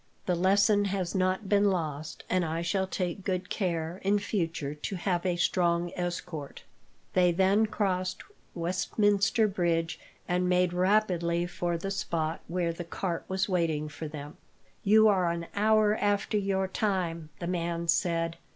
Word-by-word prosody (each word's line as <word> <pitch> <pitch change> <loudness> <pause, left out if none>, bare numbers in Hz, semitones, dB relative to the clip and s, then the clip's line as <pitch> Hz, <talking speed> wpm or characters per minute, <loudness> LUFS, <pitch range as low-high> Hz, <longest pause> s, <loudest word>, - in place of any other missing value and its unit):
"The 180 - +1
lesson 200 +3 +3
has 190 -3 -2
not 185 +2 0
been 205 0 +4
lost, 155 -6 -3
and 185 -1 +1
I 165 +1 -2
shall 190 +3 0
take 185 0 -3
good 185 -1 -2
care, 170 -3 -2
in 200 +2 +3
future, 165 -8 -2
to 150 +6 -5
have 180 0 -1
a 180 - +1
strong 175 0 +1
escort." 175 -4 -5 0.5
They 180 -1 +4
then 195 +5 +3
crossed 185 -3 -1 0.3
Westminster 200 +5 +2
Bridge, 170 -4 0 0.3
and 180 0 +1
made 180 -1 +2
rapidly 180 -3 +2
for 175 -1 -2
the 195 +4 -4
spot 165 -4 -2
where 170 -1 -1
the 175 - -6
cart 170 0 -3
was 190 +1 0
waiting 165 -5 0
for 150 +2 -6
them. 150 -1 -8 0.5
"You 220 +2 +6
are 185 -4 +3
an 170 0 -3
hour 215 0 +3
after 205 +1 0
your 195 -2 +1
time," 180 -6 -1
the 175 - -5
man 170 -1 -2
said. 165 -1 +1
180 Hz, 150 wpm, -29 LUFS, 170-195 Hz, 0.5 s, You